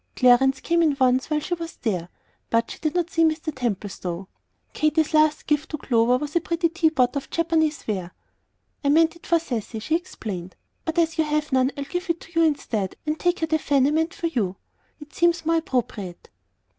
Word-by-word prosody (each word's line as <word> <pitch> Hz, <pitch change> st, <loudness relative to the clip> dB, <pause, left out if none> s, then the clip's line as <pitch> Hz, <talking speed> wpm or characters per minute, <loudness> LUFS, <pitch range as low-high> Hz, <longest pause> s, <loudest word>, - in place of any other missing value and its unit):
Clarence 260 Hz, +1 st, +4 dB
came 340 Hz, 0 st, +2 dB
in 300 Hz, -4 st, +2 dB
once 255 Hz, +1 st, +3 dB
while 305 Hz, -1 st, +1 dB
she 325 Hz, +4 st, -3 dB
was 335 Hz, -1 st, -5 dB
there, 180 Hz, -7 st, -2 dB, 0.4 s
but 230 Hz, 0 st, +1 dB
she -, -, -9 dB
did 310 Hz, +1 st, -2 dB
not 350 Hz, -1 st, 0 dB
see 330 Hz, -, +3 dB
Mr. 315 Hz, -1 st, 0 dB
Templestowe. 195 Hz, -6 st, -3 dB, 0.5 s
Katy's 310 Hz, +1 st, +1 dB
last 310 Hz, -1 st, +3 dB
gift 300 Hz, +1 st, 0 dB
to 305 Hz, -, -3 dB
Clover 240 Hz, -2 st, +2 dB
was 295 Hz, +3 st, -6 dB
a 340 Hz, -, +3 dB
pretty 335 Hz, 0 st, 0 dB
tea 335 Hz, -1 st, +2 dB
pot 260 Hz, -4 st, +1 dB
of 280 Hz, -, -4 dB
Japanese 320 Hz, -2 st, 0 dB
ware. 185 Hz, -5 st, -3 dB, 0.7 s
"I 280 Hz, -, +2 dB
meant 325 Hz, +3 st, +4 dB
it 340 Hz, -, -15 dB
for 340 Hz, -, +4 dB
Cecy," 240 Hz, -8 st, -4 dB
she 270 Hz, +9 st, 0 dB
explained. 200 Hz, -, -5 dB, 0.3 s
"But 325 Hz, 0 st, -3 dB
as 330 Hz, -1 st, +1 dB
you -, -, +5 dB
have 300 Hz, 0 st, -1 dB
none 260 Hz, +1 st, +3 dB
I'll 280 Hz, -, -2 dB
give 355 Hz, +6 st, -4 dB
it 335 Hz, 0 st, 0 dB
to 330 Hz, -, -14 dB
you -, -, +5 dB
instead, 230 Hz, -, 0 dB
and 305 Hz, 0 st, -2 dB
take 350 Hz, -1 st, +1 dB
her -, -, +3 dB
the 315 Hz, 0 st, +1 dB
fan 280 Hz, -3 st, +2 dB
I 285 Hz, -, +3 dB
meant 320 Hz, +2 st, 0 dB
for -, -, -4 dB
you. 220 Hz, -, -1 dB, 0.4 s
It 295 Hz, 0 st, -13 dB
seems 340 Hz, -1 st, +2 dB
more 330 Hz, +1 st, +3 dB
appropriate." 240 Hz, -, -3 dB
300 Hz, 210 wpm, -24 LUFS, 245-330 Hz, 0.7 s, you